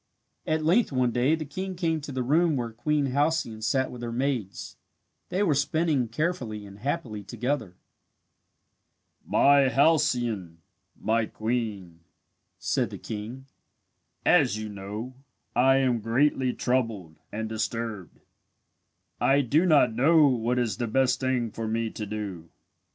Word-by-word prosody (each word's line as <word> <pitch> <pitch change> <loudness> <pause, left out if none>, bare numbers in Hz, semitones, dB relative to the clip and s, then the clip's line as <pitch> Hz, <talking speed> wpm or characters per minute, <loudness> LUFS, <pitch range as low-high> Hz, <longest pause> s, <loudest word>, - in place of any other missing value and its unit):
At 155 0 0
length 185 +7 +3
one 130 -2 +1
day 125 +6 +2
the 155 -1 -5
king 185 +6 -5
came 165 -3 -1
to 145 - -7
the 130 -1 -2
room 160 +5 +3
where 120 -3 -3
Queen 140 +4 0
Halcyone 145 -6 0
sat 130 +4 0
with 125 - -9
her 120 -1 -4
maids. 125 -5 -3 0.5
They 190 +3 0
were 170 -7 +3
spinning 145 -2 +1
carefully 120 - -3
and 100 0 -12
happily 130 -5 -3
together. 120 -2 -3 1.5
"My 140 -1 +4
Halcyone 125 - +1 0.4
my 110 0 +1
queen," 110 -7 -3 0.6
said - - -1
the - - -7
king, 115 +5 -7 0.8
"as 105 - +4
you 110 0 -5
know, 105 +5 -6 0.4
I 130 +2 +5
am 130 -3 +2
greatly 130 +3 +2
troubled 115 -12 -2
and 110 +1 -3
disturbed. 110 -4 -4 1.0
I 140 +1 +4
do 150 +8 +2
not 145 -8 +4
know 150 +6 +5
what 125 -2 +1
is 115 -5 0
the 120 - -2
best 125 +2 +2
thing 125 -3 0
for 115 +1 -4
me 115 0 -1
to 105 - -6
do. 100 -6 -6
125 Hz, 140 wpm, -27 LUFS, 110-145 Hz, 1.5 s, I